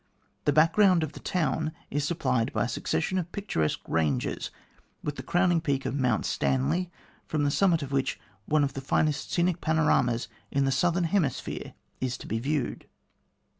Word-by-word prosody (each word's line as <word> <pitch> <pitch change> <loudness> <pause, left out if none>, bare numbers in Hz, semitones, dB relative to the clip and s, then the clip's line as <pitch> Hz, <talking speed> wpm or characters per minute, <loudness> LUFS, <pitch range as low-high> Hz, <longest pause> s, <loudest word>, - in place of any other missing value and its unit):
The - - +4
background 165 +4 +5
of 155 - -3
the - - -10
town 155 -2 -1 0.2
is 145 0 0
supplied 130 -6 0
by - - +1
a - - -2
succession 185 - -1
of 175 -1 -5
picturesque 80 - -1
ranges 75 -6 0 0.5
with 145 - -3
the 130 - -5
crowning 175 +4 +2
peak 140 -4 -1
of - - -1
Mount 125 -5 +1
Stanley, 150 +8 0 0.4
from 155 -2 0
the 145 - +2
summit 170 -2 +3
of 140 - -6
which 135 -1 0 0.3
one 155 -1 +3
of 140 - -1
the 135 - -5
finest 150 +2 0
scenic 175 0 +1
panoramas 145 -7 +2 0.2
in 140 0 +1
the 135 - +2
Southern 175 +6 +2
Hemisphere 165 -4 -1 0.2
is 125 -2 -2
to - - -10
be 110 - -2
viewed. 140 +1 -2
145 Hz, 170 wpm, -28 LUFS, 130-170 Hz, 0.5 s, background